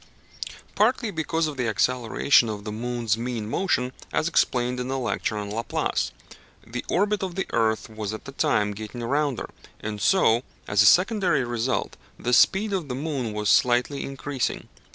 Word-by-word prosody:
Partly 225 0 +2
because 160 -1 -1
of 150 -3 -4
the 125 -2 0
acceleration 120 +3 +3
of 105 -1 -5
the 105 - -5
moon's 115 0 -1
mean 120 -3 -3
motion, 125 - 0 0.2
as - - +1
explained 125 -6 +1
in 125 - -3
the 135 +1 -1
lecture 120 -3 -2
on 105 -1 -4
Laplace 115 +2 -1 0.5
(p. 120 +3 -5
262). - - -25
The - - -1
orbit 205 +2 +2
of 185 -2 -4
the 190 - -1
earth 110 -1 +1
was 110 -2 -5
at 110 - -7
that 140 0 -11
time 105 -1 +2
getting 110 +4 -7
rounder, 140 +1 -1 0.3
and 105 -1 -5
so, 120 -12 +4 0.3
as 100 0 +3
a 105 - +6
secondary 180 - +4
result, 120 +1 -2 0.2
the 125 - -2
speed 200 - +4
of 180 -6 -1
the 125 - -3
moon 135 -5 -2
was 105 0 -3
slightly 125 +5 +3
increasing. 135 -1 -3
125 Hz, 175 wpm, -25 LUFS, 110-150 Hz, 0.5 s, a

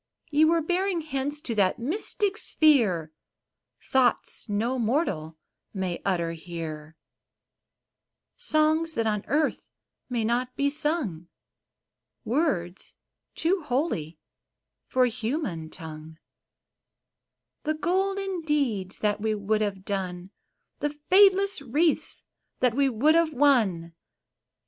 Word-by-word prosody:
Ye 305 +2 +5
were 330 0 +2
bearing 360 +1 0
hence 290 -1 -2
to 255 -7 -4
that 195 -4 +2
mystic 395 - +1
sphere 230 - +2 0.8
Thoughts 250 -3 +2
no 230 +5 -1
mortal 205 - -1 0.4
may 185 -3 -3
utter 170 -4 0
here, 160 -2 -7 0.7
— - - -61 0.6
Songs 315 +1 +2
that 230 - 0
on 210 -2 0
earth 300 +4 0 0.5
may 240 -3 -1
not 245 +2 -1
be 280 0 +1
sung, 290 - -1 0.5
— - - -57
Words 190 - -1 0.4
too 360 +3 +1
holy 250 - -2 0.7
for 255 -1 +3
human 225 - -3
tongue, 160 -1 -10 0.7
— - - -59
The 310 +1 0
golden 385 +2 -1
deeds 265 - -1
that 205 0 +1
we 220 0 0
would 210 +1 0
have 195 -2 -3
done, 185 -2 -4 0.2
— - - -52
The 295 0 -3
fadeless 390 -1 +5
wreaths 295 +5 +1 0.3
that 250 -2 +2
we 275 +2 +2
would 265 +6 +3
have 330 -1 +2
won 220 -12 +2
250 Hz, 115 wpm, -26 LUFS, 190-310 Hz, 0.8 s, Ye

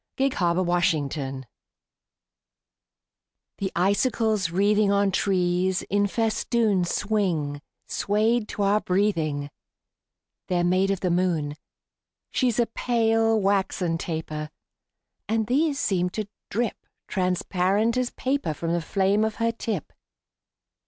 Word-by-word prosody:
SILVER 185 -10 +1
FILIGREE 150 -6 0 2.2
The 195 -1 -2
icicles 205 +1 +1
wreathing 205 +3 +3
On 200 0 +2
trees 185 -1 +1
in 205 0 +3
festoon 220 -2 +1
Swing, 170 -8 -1 0.2
swayed 215 +2 +1
to 205 - -3
our 205 +2 +3
breathing: 160 -7 0 1.0
They're 175 -1 +1
made 185 +2 +2
of 195 -2 -1
the 180 - +1
moon. 170 -5 0 0.8
She's 245 -4 +1
a 240 - +4
pale, 225 -1 +1
waxen 190 -4 0
taper; 155 -2 -4 0.8
And 220 0 +1
these 280 +5 +1
seem 180 -3 +1
to 215 -2 -2 0.2
drip 230 +1 -2 0.2
Transparent 190 +4 +1
as 255 -1 0
paper 260 - -2
From 165 +2 -2
the 170 - 0
flame 195 +4 +1
of 220 -1 -1
her 230 0 +1
tip. 220 -7 -4
195 Hz, 110 wpm, -25 LUFS, 175-220 Hz, 2.2 s, a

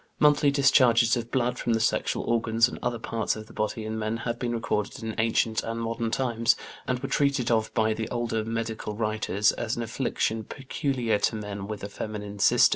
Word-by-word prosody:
Monthly 145 -1 +5
discharges 130 -4 +5
of 120 -1 -4
blood 125 -1 0
from 120 - 0
the 115 - +2
sexual 110 - 0
organs 115 0 +2
and - - -7
other 120 -1 -1
parts 115 0 -1
of 110 0 -8
the - - -15
body 110 +1 -2
in 110 0 -3
men 110 +1 -1
have 120 0 -2
been 120 -1 -1
recorded 110 -2 -2
in 110 -1 -3
ancient 110 0 +2
and 115 0 -4
modern 115 0 -2
times, 115 -2 +2 0.3
and 125 - +1
were 135 +2 -4
treated 140 -3 +1
of 110 -1 +1
by 110 -1 +3
the 110 0 -4
older 115 -2 -1
medical 115 -1 -3
writers 110 -2 +1
as 115 -1 -3
an 120 - -3
affliction 115 -1 -1
peculiar 130 -3 -1
to 110 - +1
men 105 -2 -5
with 105 -2 -6
a - - -2
feminine 105 0 -6
system. - - +6
115 Hz, 200 wpm, -27 LUFS, 110-120 Hz, 0.3 s, system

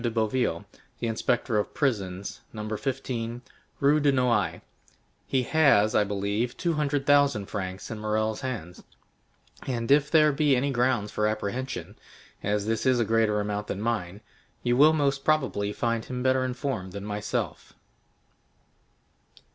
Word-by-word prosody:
de 120 - 0
Boville, 110 -4 0 0.3
the 120 - -4
inspector 115 0 0
of 105 - -4
prisons, 100 -9 -2
No. 105 -1 -6
15, 120 -2 -4 0.4
Rue 145 +2 +4
de 145 -1 +3
Nouailles; 125 -6 +1 0.7
he 130 -1 +1
has, 130 -8 +4
I - - +4
believe, 100 +4 -2
two 170 -2 0
hundred 145 -2 0
thousand 140 -7 +4
francs 95 -1 -5
in 110 - -5
Morrel's 110 0 -1
hands, 105 -10 -5 0.9
and 120 -1 -2
if 145 +1 +5
there 155 -1 +5
be 145 -1 +3
any 140 +3 0
grounds 125 -4 +1
for 105 - +1
apprehension, 110 +4 -4 0.4
as 105 0 -1
this 115 +3 -1
is 130 -2 +4
a 115 - +2
greater 110 -1 +2
amount 105 0 -3
than 100 - -4
mine, 105 -3 -2 0.4
you 120 0 +2
will 150 +4 +6
most 140 -3 +1
probably 130 -10 +1
find 115 +1 -1
him 125 -1 -4
better 130 0 +3
informed 125 -7 -3
than 100 0 -6
myself." 105 0 -3
115 Hz, 145 wpm, -27 LUFS, 105-135 Hz, 0.9 s, will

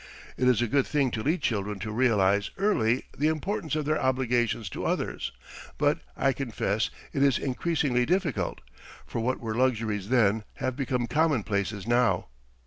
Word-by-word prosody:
It 125 - +1
is 120 -2 +4
a - - 0
good 135 +4 +2
thing 140 -4 +1
to 110 - -2
lead 155 +9 0
children 105 -2 -1
to 110 +3 -5
realize 105 -4 +2
early 130 - +2
the 150 - +1
importance 160 0 -1
of 155 -1 -1
their 155 +1 +1
obligations 125 -4 +1
to - - -5
others - - -2 0.5
but, - - +2 0.2
I 135 0 +2
confess, 110 -5 -1 0.2
it 135 - 0
is 140 -2 +4
increasingly 135 -2 0
difficult; 180 -4 0 0.4
for - - -4
what 125 +3 0
were 110 -2 -3
luxuries 110 -5 0
then 110 -4 +3
have 130 -1 -2
become 125 -2 -1
commonplaces 110 - 0
now. 120 - +2
125 Hz, 160 wpm, -27 LUFS, 110-140 Hz, 0.5 s, is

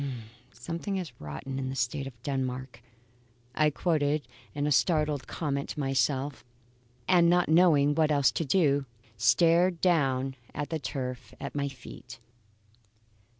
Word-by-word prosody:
"'Something 170 - -4
is 180 -4 -4
rotten 75 - -6
in 130 -1 -3
the 135 - -4
State 135 +2 -2
of 120 -3 -12
Denmark,'" 130 -3 -3 0.7
I 155 +2 +3
quoted 150 -2 0 0.3
in 145 +1 0
startled 150 -3 +1
comment 140 -3 -3
to - - -5
myself; 135 0 0 0.6
and 175 -2 +5
not 175 -1 +3
knowing 155 -4 +5
what 155 0 +2
else 140 -2 +4
to - - -2
do, 145 -3 +2 0.3
stared 170 - +3
down 135 -7 +1 0.2
at 145 - -4
the 160 - -1
turf 130 -3 -5
at - - -6
my 140 -1 -1
feet. 125 -2 -11
145 Hz, 135 wpm, -28 LUFS, 130-160 Hz, 0.7 s, and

